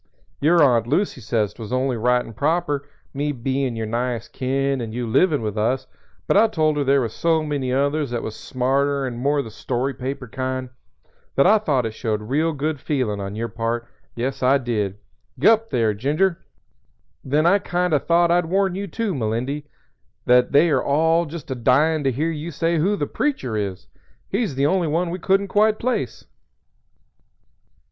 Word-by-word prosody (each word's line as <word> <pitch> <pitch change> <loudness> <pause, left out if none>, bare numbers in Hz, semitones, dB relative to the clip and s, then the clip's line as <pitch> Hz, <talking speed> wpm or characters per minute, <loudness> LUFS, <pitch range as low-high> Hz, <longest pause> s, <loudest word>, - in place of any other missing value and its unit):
Your 165 +2 +4
Aunt 120 -5 +3
Lucy 150 0 0
says 110 -2 -1
'twas 110 -2 -9
only 130 0 0
right 125 +2 +1
and 115 - -11
proper, 145 0 0 0.2
me 145 +1 -1
bein' 130 -1 -2
your 110 -1 -3
nighest 120 +1 -3
kin 135 0 -1
and 115 -1 -5
you 125 0 -2
livin' 145 +4 +2
with 105 0 -3
us; 130 +4 0 0.4
but - - +1
I 215 +3 +6
told 155 -7 +1
her 145 - +1
there 140 0 +3
was 115 -3 -3
so 165 -2 +1
many 140 -4 -2
others 140 +2 0
that 120 -1 -3
was 110 - -5
smarter 135 +2 0
and 120 -2 -5
more 140 +2 +1
the 110 - -9
story 130 +4 -2
paper 130 0 -5
kind, 130 +1 -4 0.6
that 140 - +4
I 215 +3 +6
thought 140 - 0
it 110 - -3
showed 110 -2 -2
real 150 +9 0
good 150 0 -2
feelin' 130 -8 -1
on 100 +1 -5
your 115 +2 -2
part; 115 +1 -3 0.3
yes, 125 +3 -3
I 130 +2 +4
did. 105 -6 -2 0.4
G'up, 225 - +4
there, 115 -3 +1
Ginger! 155 - 0 0.8
Then 145 +4 +1
I 195 +4 +5
kind 180 -2 -1
o' 150 - +4
thought 170 +2 +3
I'd 175 -1 +2
warn 190 +1 +1
you, 200 +2 -4
too, 215 +2 -2
Melindy, 130 +4 -2 0.6
that 125 0 +4
they 155 +2 +4
all 160 +5 +2
are - - -10
just 160 -4 -8
a - - -1
dyin' 145 +6 +2
to 135 - +3
hear 155 +7 -1
you 155 +1 -5
say 165 +1 0
who 195 +7 +2
'The 145 - -1
Preacher' 140 - -2
is. 100 - -3 0.4
He's 200 - -1
the 135 +1 +1
only 180 +2 +2
one 170 +3 0
we 180 - -4
couldn't 195 +2 +1
quite 215 +2 +3
place." 230 - -2
140 Hz, 185 wpm, -22 LUFS, 120-165 Hz, 0.8 s, I